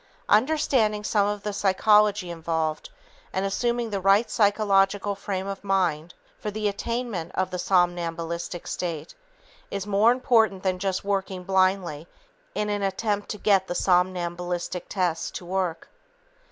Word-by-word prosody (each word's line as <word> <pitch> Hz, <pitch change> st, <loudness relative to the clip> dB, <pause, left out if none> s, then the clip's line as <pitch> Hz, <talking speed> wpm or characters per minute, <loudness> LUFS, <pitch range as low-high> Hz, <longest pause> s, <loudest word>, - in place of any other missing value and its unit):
Understanding 225 Hz, -4 st, +2 dB
some 205 Hz, -1 st, +2 dB
of 205 Hz, -1 st, -3 dB
the 210 Hz, -, -3 dB
psychology 205 Hz, -1 st, +3 dB
involved 160 Hz, -2 st, -2 dB, 0.4 s
and 190 Hz, +1 st, -1 dB
assuming 235 Hz, +3 st, -1 dB
the 200 Hz, -, -1 dB
right 195 Hz, +4 st, +3 dB
psychological 205 Hz, -1 st, +2 dB
frame 195 Hz, -1 st, -4 dB
of 195 Hz, 0 st, -6 dB
mind 180 Hz, -4 st, 0 dB, 0.2 s
for 210 Hz, -, -4 dB
the 210 Hz, 0 st, -2 dB
attainment 210 Hz, -4 st, -3 dB
of 185 Hz, -, -1 dB
the 180 Hz, -, -3 dB
somnambulistic 175 Hz, -2 st, -1 dB
state 165 Hz, -3 st, -4 dB, 0.6 s
is 200 Hz, -1 st, -4 dB
more 205 Hz, +3 st, +4 dB
important 230 Hz, -6 st, +2 dB
than 185 Hz, -1 st, 0 dB
just 190 Hz, -1 st, -1 dB
working 195 Hz, -2 st, -2 dB
blindly 185 Hz, -4 st, +1 dB, 0.5 s
in 210 Hz, -, -1 dB
an 205 Hz, -1 st, -1 dB
attempt 205 Hz, +1 st, -1 dB
to 210 Hz, -, -4 dB
get 195 Hz, -2 st, +2 dB
the 175 Hz, -, -3 dB
somnambulistic 180 Hz, -1 st, 0 dB
tests 180 Hz, -4 st, -1 dB
to 180 Hz, -, -8 dB
work. 180 Hz, -2 st, -2 dB
195 Hz, 140 wpm, -25 LUFS, 180-210 Hz, 0.6 s, more